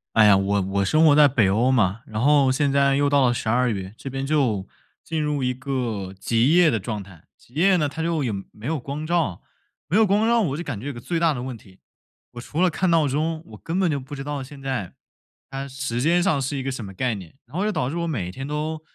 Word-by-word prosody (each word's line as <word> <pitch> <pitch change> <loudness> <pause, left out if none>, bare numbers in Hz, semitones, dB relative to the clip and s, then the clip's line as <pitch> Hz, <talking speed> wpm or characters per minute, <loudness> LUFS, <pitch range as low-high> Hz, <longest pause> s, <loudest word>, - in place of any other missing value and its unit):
哎 110 -1 +7
呀， 105 - +7
我 100 +1 +1
我 95 +1 -1
生 155 +10 +4
活 145 - +6
在 150 -1 +7
北 115 -8 +2
欧 115 +6 +2
嘛， 110 -4 +2
然 110 -1 -4
后 140 -1 +4
现 140 +1 +1
在 140 0 +3
又 145 +1 +2
到 140 -2 +4
了 120 - +2
十 120 - -4
二 125 +3 +2
月， 95 -3 -4
这 135 - -7
边 135 +1 -4
就 125 -10 0 0.4
进 160 -1 -2
入 150 -2 -1
一 125 0 +1
个 120 -8 -3
极 120 +10 +2
夜 175 -3 +6
的 115 - 0
状 105 +1 -4
态。 95 -4 -17
极 120 - -24
夜 185 +6 +4
呢， 150 -3 +1
它 145 +3 -6
就 165 -2 0
也 120 - -1 0.2
没 105 - -13
有 155 +2 -1
光 140 +4 -5
照。 160 - 0 0.5
没 - - +2
有 220 - +6
光 210 +3 +2
照 235 0 +4
我 150 -10 -1
就 170 - -4
感 145 -10 -5
觉 115 - -9
有 - - -2
一 - - -9
个 120 - -8
最 165 +8 -2
大 165 -2 +3
的 125 -3 -5
问 130 -1 -5
题， 95 -4 -18 0.5
我 120 - -8
除 150 +6 -5
了 185 - +5
看 185 +4 0
闹 165 -3 +3
钟， 155 +4 -1
我 - - -12
根 170 +3 -2
本 185 -3 +2
就 145 -3 -1
不 135 +2 -9
知 135 - -6
道 145 -1 -4
现 140 +2 -12
在， 130 -9 -3 0.6
它 135 0 -5
时 135 -3 -4
间 170 +5 +3
上 175 -6 +2
是 135 +2 -2
一 135 - -3
个 135 - -2
什 130 -3 -5
么 95 - -8
概 125 +5 -1
念， 95 -1 -11
然 125 +6 -15
后 190 - 0
就 215 - +1
导 125 -10 -1
致 150 - -5
我 170 0 -1
每 100 - -3
天 135 +7 -7
都 155 +1 -3
135 Hz, 295 characters per minute, -23 LUFS, 115-155 Hz, 0.6 s, 哎